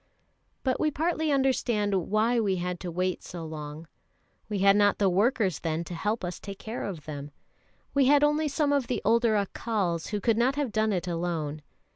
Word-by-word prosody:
But 260 -2 0
we 305 - +2
partly 315 0 0
understand 245 -6 +1 0.2
why 225 +3 +2
we 200 -4 +1
had 180 0 -3
to 180 - -5
wait 180 +2 -1
so 170 -2 -7
long; 155 0 -7 0.6
we 210 - -1
had 195 +1 +5
not 205 0 +4
the 195 -2 +3
workers 200 - +2
then 165 0 -2
to 175 - -8
help 205 +4 -1
us 175 0 -4
to - - -18
take 200 -1 -7
care 225 +4 -5
of 170 -7 -6
them. 145 -2 -6 0.6
We 280 -1 +4
had 290 +2 +5
only 300 +1 +3
some 285 0 +1
of 275 -4 +1
the 245 -4 -2
older 230 0 +3
Accals, 200 -4 -1
who 210 - -2
could 225 +2 +2
not 260 +3 +2
have 285 -5 -1
done 215 0 +1
it 180 -2 -1
alone. 165 -3 -2
205 Hz, 200 wpm, -28 LUFS, 175-245 Hz, 0.6 s, had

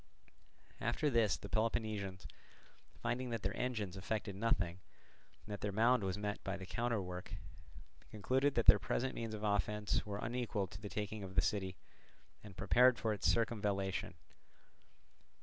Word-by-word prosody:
After 130 +6 +1
this 115 -5 +3
the - - -8
Peloponnesians, 110 -4 -1 0.8
finding 120 +1 -1
that 115 -3 -3
their 100 +3 -1
engines 110 -7 -2
effected 100 +1 -3
nothing, 95 -4 0 0.7
and 105 - -6
that 100 - -6
their 105 - -1
mound 115 +3 +4
was 95 0 -1
met 105 0 -3
by 100 0 -2
the 95 - -7
counterwork, 100 -5 -2 0.7
concluded 130 +7 +1
that 120 - +2
their 100 +1 +9
present 130 +5 -1
means 115 -2 -4
of 105 - -7
offence 105 0 +1
were 100 -1 -4
unequal 115 -2 -1
to 90 +2 -11
the 105 - -5
taking 105 +2 -3
of 95 -1 -7
the - - +5
city, 95 -3 -1 0.7
and 100 -3 -11
prepared 125 +5 +5
for 110 -1 0
its 105 - 0
circumvallation. 105 -4 0
105 Hz, 150 wpm, -37 LUFS, 100-115 Hz, 0.8 s, their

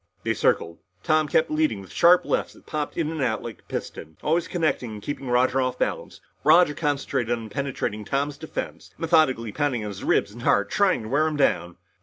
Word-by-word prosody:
They - - +1
circled. 85 0 0 0.2
Tom 155 -1 +2
kept 160 +2 +2
leading 155 -9 +1
with 95 -2 -12
sharp 175 - +5
lefts - - -1
that - - -20
popped 150 -2 -4
in 160 -2 0
and 160 -2 -4
out 115 -4 0
like 115 -2 -7
a - - -26
piston, 80 0 -6
always 165 +3 +1
connecting 155 -9 -1
and 105 - -7
keeping 140 -2 -5
Roger 125 +2 +2
off 130 -1 -1
balance. - - -3 0.2
Roger 160 0 +6
concentrated 140 -5 -1
on 110 -1 -8
penetrating 120 -4 -3
Tom's 140 +5 -2
defense, 160 - -6
methodically 155 -9 +2
pounding 140 -2 -1
his 105 -2 -6
ribs - - +2
and 120 +3 -11
heart 100 -3 +2
and - - -8
trying 195 - +2
to 110 - -7
wear 150 +5 +2
him 155 -1 -2
down. 85 - +1
140 Hz, 205 wpm, -24 LUFS, 110-155 Hz, 0.2 s, Roger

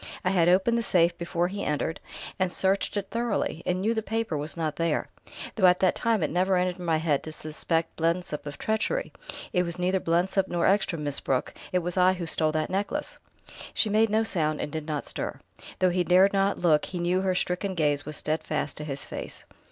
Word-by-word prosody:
I 180 - +3
had 175 -3 +4
opened 195 +6 +3
the - - 0
safe 175 -5 +3
before 170 0 -1
he 200 +2 -4
entered, 150 +2 -1 0.4
and 185 -1 +1
searched 195 +3 0
it 200 -1 -3
thoroughly, 230 -7 -1
and 180 0 +1
knew 220 +4 +2
the 220 - -1
paper 220 -4 -2
was 150 +2 -3
not 160 -2 -1
there 165 0 0 0.4
though 190 -5 +4
at 180 0 +4
that 185 - +4
time 225 -6 +1
it 150 - 0
never 185 +3 +2
entered 180 0 0
my 165 -3 +1
thick 155 - -4
head 150 -4 +2
to 155 - -7
suspect 160 +2 -2
Blensop 165 -2 -1
of 145 - -6
treachery. 220 - -1 0.4
It 180 - +3
was 170 -1 -2
neither 185 +1 +1
Blensop 180 +3 +1
nor 175 -1 0
Ekstrom, 190 -5 +2
Miss 145 -1 -1
Brooke... 130 -1 -1 0.2
it 180 -1 +1
was 175 +2 -3
I 185 +1 +5
who 180 -2 -4
stole 155 -1 +1
that 155 0 -1
necklace." 205 +10 -2 0.6
She 215 - +3
made 220 +1 +4
no 220 +2 +2
sound 155 -8 0
and 150 - -3
did 155 0 -5
not 150 -2 -2
stir; - - -4 0.2
and - - -13
though 185 -1 +3
he 180 0 +1
dared 185 +3 +5
not 195 0 +2
look 155 -4 +3
he 185 - -6
knew 175 +2 +1
her 190 -1 +1
stricken 180 +2 -1
gaze 145 -3 +1
was 150 0 -3
steadfast 155 -1 -2
to 150 - -4
his 140 -2 -5
face. - - -7
180 Hz, 220 wpm, -27 LUFS, 160-195 Hz, 0.6 s, I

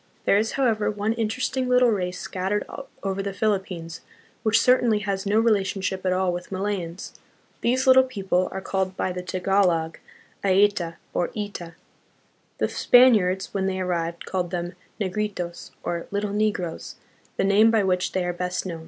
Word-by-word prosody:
There 200 - +4
is, 220 +1 -1
however, 230 -6 +1
one 210 +1 -1
interesting 250 +3 -1
little 250 -1 +5
race 180 -3 -2
scattered 195 +3 -2 0.4
over 195 0 -1
the 200 0 -4
Philippines, 185 -5 -2 0.4
which 225 0 +3
certainly 245 -2 +4
has 195 -1 -2
no 210 +2 +3
relationship 195 -4 0
at - - +2
all 185 -1 +1
with 175 +2 -6
Malayans. 190 -2 -3 0.5
These 255 +3 +1
little 260 0 +8
people 195 -8 -1
are 190 - -5
called 190 -1 -2
by 185 - -1
the 180 0 -4
Tagalog, 180 -3 +1 0.4
"Aeta" 190 -3 +2 0.2
or 175 - 0
"Ita." 190 -5 -5 0.8
The - - +1
Spaniards, 210 -7 +4
when 195 -1 0
they 190 0 -2
arrived, 170 -2 -2
called 180 -2 -2
them 175 0 -3 0.3
"Negritos," 190 -3 -3
or 170 -1 -3
"little 200 0 -2
negroes," 205 -6 -2 0.4
the - - +1
name 200 +3 +5
by 220 -2 +3
which 185 -1 0
they 185 -1 0
are 175 - -1
best 180 +1 -3
known. 170 -3 -5
195 Hz, 160 wpm, -24 LUFS, 180-215 Hz, 0.8 s, little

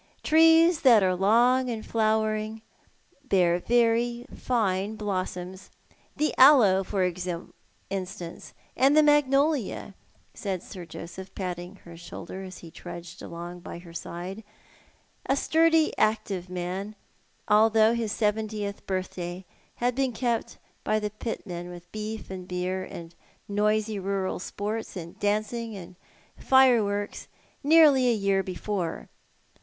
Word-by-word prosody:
Trees 325 +1 +5
that 235 -6 +6
are 185 -1 +3
long 240 +7 +3
in 225 -2 -4
flowering 215 0 0 0.6
bear 180 -6 +3
very 235 +2 +1
fine 210 -4 0
blossoms. 185 -2 -4 0.5
The 305 - 0
aloe, 240 -9 +7
for 190 0 -1 0.9
instance, 185 -3 -6 0.2
and 275 +3 +4
the 310 - +7
magnolia," 285 -6 +2 0.4
said 190 -3 -4
Sir 180 -4 -9
Joseph, 185 +3 -9
patting 180 0 -5
her 170 -1 -11
shoulder, 175 +2 -8
as 185 -1 -9
he 165 - -11
trudged 170 +1 -9
along 175 +1 -7
by 170 - -8
her 170 -1 -13
side, 180 +5 -6 0.8
a 270 - +3
sturdy, 325 +2 +3
active 195 -4 0
man, 185 +4 -4 0.5
although 220 +1 +5
his 230 -3 -2
seventieth 210 -1 -2
birthday 185 -1 -4 0.3
laad 245 +1 +1
been 265 -1 0
kept 235 0 -2 0.3
by 215 - +1
the 210 -1 -2
pitmen 180 -5 -6
with 175 0 -11
beef 215 -1 -6
and 185 -1 -7
beer, 185 +1 -2
and 170 -2 -9 0.3
noisy 210 +1 0
rural 195 0 -2
sports, 210 +3 -5
aud 170 -1 -9
dancing 215 +2 -1
aud 185 -1 -10 0.4
fireworks, 225 -6 +3 0.4
nearly 290 -4 +6
a - - +4
year 195 -2 +1
before. 185 -1 -4
210 Hz, 120 wpm, -27 LUFS, 185-235 Hz, 0.9 s, aloe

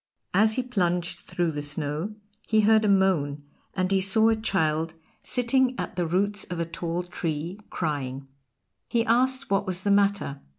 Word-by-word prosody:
As 215 +3 +4
he 255 - 0
plunged 180 -7 -1
through 175 -1 -2
the 145 -1 -4
snow 150 +6 -4 0.3
he 220 0 +4
heard 220 +1 +5
a - - +2
moan, 175 -8 +2 0.3
and 185 0 0
he 195 -1 +3
saw 220 +4 +4
a 225 - +3
child 165 -7 0 0.3
sitting 255 +1 +1
at - - -4
the 175 -2 0
roots 200 +4 0
of 175 -1 -5
a 170 - 0
tall 170 +1 -3
tree 170 +1 -4
crying. 140 -4 -3 0.6
He 230 -1 +1
asked 260 +2 +2
what 195 - +1
was 185 0 -2
the 200 - +2
matter. 200 -8 +1
185 Hz, 170 wpm, -26 LUFS, 165-215 Hz, 0.6 s, heard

